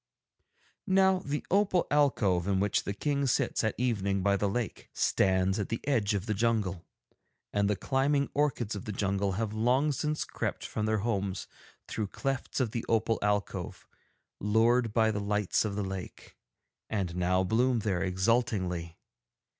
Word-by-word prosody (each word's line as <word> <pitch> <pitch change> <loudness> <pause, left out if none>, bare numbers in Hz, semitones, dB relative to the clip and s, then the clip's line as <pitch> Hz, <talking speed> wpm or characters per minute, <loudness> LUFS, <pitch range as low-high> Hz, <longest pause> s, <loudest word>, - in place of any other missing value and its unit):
'Now 190 -1 +4
the 145 -3 -4
opal 190 -2 +3
alcove 105 -12 +2
in 95 -1 +2
which 100 +1 +1
the 100 - -2
King 140 +2 0
sits 120 - +1
at 110 - 0
evening 100 -6 0
by 100 0 +3
the 100 0 0
lake 120 +2 -4
stands 95 +1 +2
at 100 - -2
the 115 - -2
edge 110 -7 +2
of 100 -1 -2
the 110 - -1
jungle, 105 -5 0 0.7
and 100 0 +2
the 105 - +2
climbing 140 +5 +1
orchids 140 -7 0
of 100 - -6
the 105 - -3
jungle 100 -1 0
have 105 +2 -2
long 125 +7 +2
since 150 +3 -1
crept - - -4
from 105 0 -2
their 110 0 +2
homes 100 -4 -1 0.4
through 105 - -3
clefts 135 +7 -3
of 125 -5 0
the 115 -1 -3
opal 115 0 +2
alcove, 105 -2 -2 0.5
lured 115 +3 +3
by 110 0 +3
the 105 -1 -2
lights 105 0 +1
of 100 -2 -2
the 105 - -1
lake, 95 -1 -7 0.5
and 95 -5 -2
now 90 +1 +2
bloom 120 +5 +2
there 95 -4 -1
exultingly. 95 -4 0
105 Hz, 160 wpm, -30 LUFS, 100-125 Hz, 0.7 s, Now